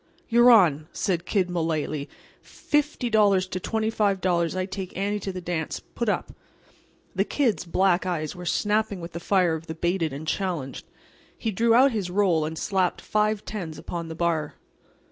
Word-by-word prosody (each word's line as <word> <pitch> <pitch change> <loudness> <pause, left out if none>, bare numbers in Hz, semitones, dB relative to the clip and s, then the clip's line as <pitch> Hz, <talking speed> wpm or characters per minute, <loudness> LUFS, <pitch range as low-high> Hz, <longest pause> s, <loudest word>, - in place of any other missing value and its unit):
"You're 240 +1 +6
on," 165 -10 +5
said 175 -3 -1
Kid 190 -4 +1
Mullaly. 160 -4 -2 0.3
"Fifty 295 -4 -1
dollars 205 -4 +4
to 185 0 -4
$25 195 -6 0
I 185 - 0
take 190 -1 -6
Annie 205 +2 -1
to 195 0 -4
the 185 -1 -6
dance. 170 -3 -3
Put 235 -2 -1
up." - - -2 0.8
The - - +2
Kid's 250 -10 0
black 185 +1 +2
eyes 155 -4 -2
were 180 -1 -7
snapping 210 -1 0
with 170 0 -7
the 170 - -6
fire 180 -1 +2
of 160 +1 -5
the 160 - -5
baited 170 -1 0
and 145 +3 -7
challenged. 170 -8 -3 0.5
He 225 - -2
drew 230 +3 +3
out 265 +3 +6
his 205 -6 -2
"roll" 180 -5 +2
and 160 +1 -5
slapped 190 +1 0
five 215 0 0
tens 170 -8 -5
upon 170 +1 -5
the 160 - -6
bar. 160 -3 -1
185 Hz, 170 wpm, -25 LUFS, 165-210 Hz, 0.8 s, You're